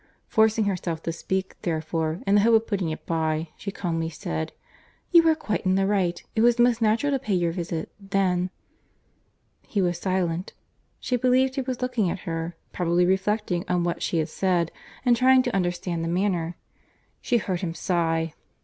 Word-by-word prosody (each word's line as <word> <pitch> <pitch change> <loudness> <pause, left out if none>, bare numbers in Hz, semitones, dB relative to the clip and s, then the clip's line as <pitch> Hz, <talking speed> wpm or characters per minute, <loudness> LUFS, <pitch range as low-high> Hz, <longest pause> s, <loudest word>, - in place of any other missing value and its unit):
Forcing 220 0 +3
herself 175 -4 -2
to 165 - -1
speak, 190 +3 -3
therefore, 160 0 -2
in 200 - +2
the 205 - +6
hope 230 +2 +5
of 225 0 +3
putting 195 -6 -1
it 155 - -6
by, 160 -1 -1
she 200 - -6
calmly 165 -4 -2
said, 80 - -4 0.6
"You 335 -1 +7
are 320 - +4
quite 215 -9 -2
in 185 0 +2
the 195 0 +2
right; 190 -4 0
it 220 - +2
was 240 +1 +5
most 240 -1 +3
natural 225 +6 +2
to 275 - +1
pay 210 -5 -1
your 175 -2 +1
visit, 170 -2 -4
then"— 190 -2 0 1.2
He 205 - -1
was 175 -2 +1
silent. 180 -2 -1 0.5
She 250 - 0
believed 255 +2 +3
he 270 - -1
was 255 -1 -4
looking 245 -7 +1
at 185 - -4
her; 165 -1 -4 0.2
probably 175 0 +2
reflecting 190 -1 0
on 180 -1 +2
what 170 0 -2
she 170 - 0
had 160 -1 0
said, 175 -3 0 0.3
and 245 -1 +5
trying 255 +1 +5
to 245 -4 -2
understand 175 -2 -1
the - - -2
manner. 175 -2 0 0.7
She 245 - +2
heard 190 -5 -2
him 165 -3 -3
sigh. 165 -3 0
185 Hz, 185 wpm, -25 LUFS, 170-220 Hz, 1.2 s, You